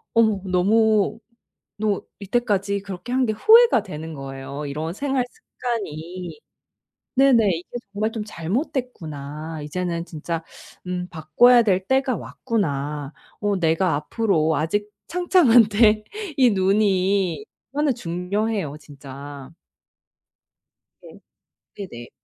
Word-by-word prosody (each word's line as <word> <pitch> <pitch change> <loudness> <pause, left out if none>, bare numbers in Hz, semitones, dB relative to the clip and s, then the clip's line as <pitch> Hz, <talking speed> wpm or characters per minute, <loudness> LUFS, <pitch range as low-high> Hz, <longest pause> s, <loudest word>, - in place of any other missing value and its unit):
어머 220 -4 +3
너무 215 +3 +3 0.6
너 210 -2 0 0.2
이때까지 200 -2 0
그렇게 200 +5 -7
한 260 0 +3
게 220 - 0
후회가 455 - +6
되는 160 -3 -7
거예요, 135 +1 -6
이런 155 +3 -4
생활 270 +1 0
습관이. 180 - -6 0.8
네네. 250 -6 +5
'이게 175 - -9 0.3
정말 215 +2 -1
좀 215 -2 -4
잘못됐구나. 160 - -4
이제는 170 +2 -3
진짜 165 0 -4 0.5
음 180 0 -3
바꿔야 205 +10 +5
될 190 -3 +1
때가 265 0 +2
왔구나. 150 - -3 0.3
어 205 -1 +1
내가 165 +1 +2
앞으로 160 -1 +1
아직 205 +7 -1 0.2
창창한데' 230 - +5 0.4
이 255 -2 +6
눈이 195 -1 +2 0.3
얼마나 290 0 +1
중요해요, 185 - -2
진짜. 140 0 -10 1.5
네. - - -14 0.6
네네. 120 -12 -8
195 Hz, 225 characters per minute, -23 LUFS, 160-225 Hz, 1.5 s, 후회가